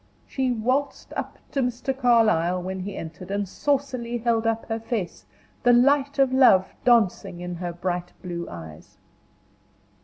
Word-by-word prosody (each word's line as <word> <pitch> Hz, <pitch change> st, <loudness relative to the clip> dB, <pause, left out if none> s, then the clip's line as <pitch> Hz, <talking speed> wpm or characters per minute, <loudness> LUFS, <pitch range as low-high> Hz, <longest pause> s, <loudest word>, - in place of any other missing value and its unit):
She 260 Hz, -2 st, -1 dB
waltzed 255 Hz, +5 st, -1 dB
up -, -, -4 dB
to 275 Hz, -, 0 dB
Mr. 250 Hz, +2 st, -2 dB
Carlyle 220 Hz, -9 st, +3 dB
when 190 Hz, +1 st, -4 dB
he 195 Hz, +2 st, -5 dB
entered, 165 Hz, +3 st, -8 dB
and 200 Hz, 0 st, -1 dB
saucily 255 Hz, 0 st, -1 dB
held 230 Hz, -1 st, +1 dB
up 225 Hz, 0 st, -1 dB
her 225 Hz, 0 st, -3 dB
face, 205 Hz, -, -4 dB, 0.3 s
the 245 Hz, -, +5 dB
light 280 Hz, +3 st, +3 dB
of 270 Hz, -2 st, +3 dB
love 195 Hz, -8 st, +5 dB
dancing 220 Hz, -7 st, +2 dB
in 180 Hz, 0 st, -5 dB
her 175 Hz, 0 st, -4 dB
bright 175 Hz, 0 st, -3 dB
blue 170 Hz, -1 st, -5 dB
eyes. 80 Hz, -2 st, -11 dB
225 Hz, 150 wpm, -25 LUFS, 180-255 Hz, 0.3 s, the